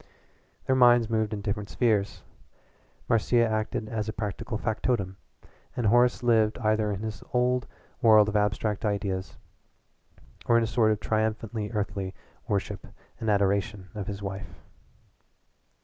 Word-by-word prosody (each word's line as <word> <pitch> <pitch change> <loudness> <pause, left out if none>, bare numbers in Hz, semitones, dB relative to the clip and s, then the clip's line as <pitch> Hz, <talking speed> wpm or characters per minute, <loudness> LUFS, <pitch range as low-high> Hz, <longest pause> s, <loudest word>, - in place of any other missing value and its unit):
Their 130 - +2
minds 120 -3 +5
moved 110 -1 0
in 105 -2 -4
different 100 0 -3
spheres. 105 -5 0 0.8
Marcia 115 +1 +3
acted 110 0 -2
as 110 -1 -3
practical 110 +2 -4
factotum, 110 -4 -1 0.6
and 120 - -1
Horace 120 +3 +3
lived 110 -3 +3
either 110 -2 +1
in 100 0 -4
his 110 -1 -5
old 125 0 +2 0.3
world 110 -3 +6
of 105 - -3
abstract 105 +1 0
ideas 100 -3 -2 1.1
or 115 - +5
in 115 - +3
a - - +1
sort 110 -1 +2
of 105 - 0
triumphantly 110 0 -1
earthy 100 -3 -3 0.3
worship 100 -1 -2 0.3
and 110 - -2
adoration 100 -1 0
of 105 -2 -5
his 100 -1 -5
wife. 95 -3 -7
110 Hz, 135 wpm, -27 LUFS, 100-115 Hz, 1.1 s, world